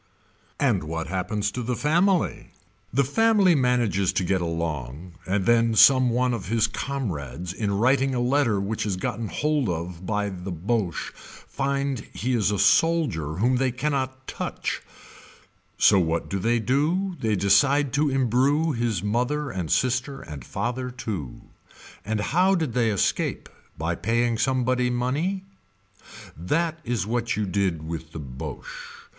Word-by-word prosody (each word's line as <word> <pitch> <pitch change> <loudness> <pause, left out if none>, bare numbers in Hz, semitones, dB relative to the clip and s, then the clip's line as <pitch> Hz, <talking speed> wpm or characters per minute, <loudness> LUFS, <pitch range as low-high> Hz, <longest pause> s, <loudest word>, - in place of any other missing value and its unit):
And - - +1
what 80 +1 -3
happens 100 +3 -1
to 125 - -4
the 125 +1 -2
family. 175 - +1 0.4
The 140 +4 +3
family 200 - +4
manages 120 - +2
to 95 - 0
get 95 +1 0
along 80 -1 -4
and 95 0 0
then 115 0 +3
some 130 +3 +7
one 125 +1 +1
of 115 -5 -4
his 115 +1 +2
comrades 90 - -4
in 100 +1 -2
writing 130 +3 +2
a - - 0
letter 120 -4 +2
which 100 +3 -2
is 100 -3 -2
gotten 110 +4 -3
hold 150 -2 0
of 85 +1 -4
by 105 -1 0
the 95 0 -6
Boche 95 +1 -2
find 140 -1 -3
he 125 +3 -2
is 110 -5 +2
a 105 - 0
soldier 145 - +2
whom 120 +7 +2
they 130 0 +1
cannot 130 0 -2
touch, - - -4 1.0
so 100 - +5
what 85 -1 -1
do 95 - -1
they 115 +5 +2
do 155 - 0
they 110 -3 +1
decide 120 +9 +3
to 145 +1 +2
embrew 135 +5 +2
his 115 -7 -1
mother 125 +7 -1
and 90 -6 -4
sister 130 +2 0
and 75 -4 -9
father 125 - -3
too. 100 - -6 0.6
And 110 0 -2
how 180 - +3
did 160 -9 -1
they 120 -2 +2
escape 100 -3 -1 0.3
by 80 +2 -1
paying 115 +4 0
sombody 125 -1 +1
money. 145 +11 -1 0.9
That 160 - -1
is 115 - -1
what 115 +1 -1
you 105 +1 -1
did 90 -5 -1
with 80 -1 -6
the 80 - -6
Boche. 65 -3 -8
115 Hz, 150 wpm, -25 LUFS, 95-135 Hz, 1.0 s, some